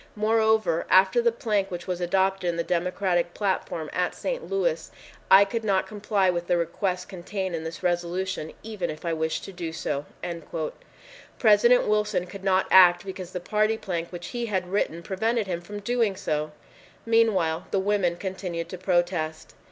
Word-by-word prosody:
Moreover, 220 -4 +2
after 190 +5 +5
the 235 0 +3
plank 210 -4 -1
which 175 -1 -6
was 180 -1 -3
adopted 190 +1 +1
in 170 - -2
the 170 - 0
Democratic 175 0 0
platform 185 -5 -2
at 180 0 0
St. - - -4
Louis, 475 +6 0 0.4
I 195 +1 +8
could 225 +3 -3
not 195 -3 +1
comply 205 -2 0
with 175 -1 -3
the 175 - +2
request 180 +2 -2
contained 190 0 -4
in 160 -1 -3
this 160 +3 -7
resolution 175 -1 -2
even 215 -5 -4
if 155 +2 -7
I 170 - 0
wished 160 0 -2
to - - -8
do 170 -3 -5
so." 145 -3 -3 1.3
President 235 +3 +5
Wilson 210 -3 +1
could 190 +2 -10
not 190 -1 +3
act 180 0 +7
because 185 -2 -6
the 180 - -4
party 215 +4 +1
plank 170 -5 -4
which 175 -1 -7
he 240 -1 -3
had 185 -4 -2
written 170 -4 -1
prevented 220 +5 0
him 175 -3 -3
from 205 +3 -7
doing 230 -2 +1
so! 150 -3 -2 0.5
Meanwhile 190 -8 +2
the - - 0
women 190 -3 +1
continued 180 -3 -5
to 185 - -7
protest. 175 -4 -1
190 Hz, 170 wpm, -26 LUFS, 175-210 Hz, 1.3 s, I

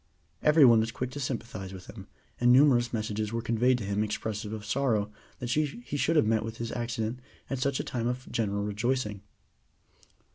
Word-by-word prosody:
Every 150 -1 +6
one 115 -2 +7
was 110 +1 0
quick 125 +2 -4
to 145 - -6
sympathize 115 -8 -4
with 95 -1 -9
him, 100 -2 -11 0.3
and 120 0 +5
numerous 125 -3 +5
messages 110 -1 -2
were 115 0 -2
conveyed 120 +2 +2
to 115 - -5
him 100 +1 0
expressive 105 0 -3
of 110 -1 -6
sorrow 110 -7 0 0.3
that 120 -1 -4
he 150 +1 +1 0.2
should 145 +4 +1
have 150 - +5
met 110 0 +2
with 115 +1 -6
his 115 -1 -4
accident 120 0 -3 0.3
at 135 - -1
such 135 +1 0
a - - -1
time 120 -2 -2
of 125 +1 -3
general 100 -3 -1
rejoicing. 105 0 -1
115 Hz, 190 wpm, -29 LUFS, 105-130 Hz, 0.3 s, one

